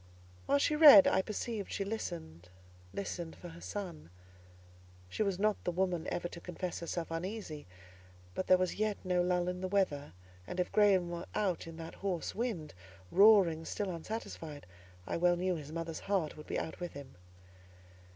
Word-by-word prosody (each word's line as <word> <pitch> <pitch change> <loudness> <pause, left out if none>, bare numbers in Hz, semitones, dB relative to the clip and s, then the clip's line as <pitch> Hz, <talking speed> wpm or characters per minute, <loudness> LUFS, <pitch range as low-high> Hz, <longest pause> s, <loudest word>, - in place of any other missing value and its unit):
While 280 - +4
she 295 +1 +2
read, 295 -11 +10
I - - +3
perceived 215 +1 -4
she 195 - -2
listened—listened 90 - -7
for 175 - -10
her 170 +1 -12
son. 175 - -6 1.0
She 100 - -4
was 200 -3 +1
not 210 +1 +1
the - - -1
woman 180 -2 -1
ever 175 - -2
to 170 - -10
confess 180 0 -4
herself 170 0 -4
uneasy, 165 - -5 0.7
but 185 - -3
there 185 - +7
was 185 0 0
yet 215 -1 +1
no 180 -1 +2
lull 180 0 +1
in 180 0 -3
the 185 - -1
weather, 185 -7 0 0.3
and 180 - -5
if 180 - 0
Graham 195 -4 +4
were 170 0 -5
out 185 -6 0
in 165 -1 -9
that 165 0 -7
hoarse 185 -4 -3
wind—roaring 165 - +2
still 195 +3 -3
unsatisfied—I 145 - -7
well 175 +1 +4
knew 180 +1 0
his 150 -3 -6
mother's 165 0 -4
heart 190 -6 -1
would 150 - -11
be - - -2
out - - -4
with 175 -1 -5
him. 140 -2 -10
175 Hz, 165 wpm, -33 LUFS, 155-195 Hz, 1.0 s, read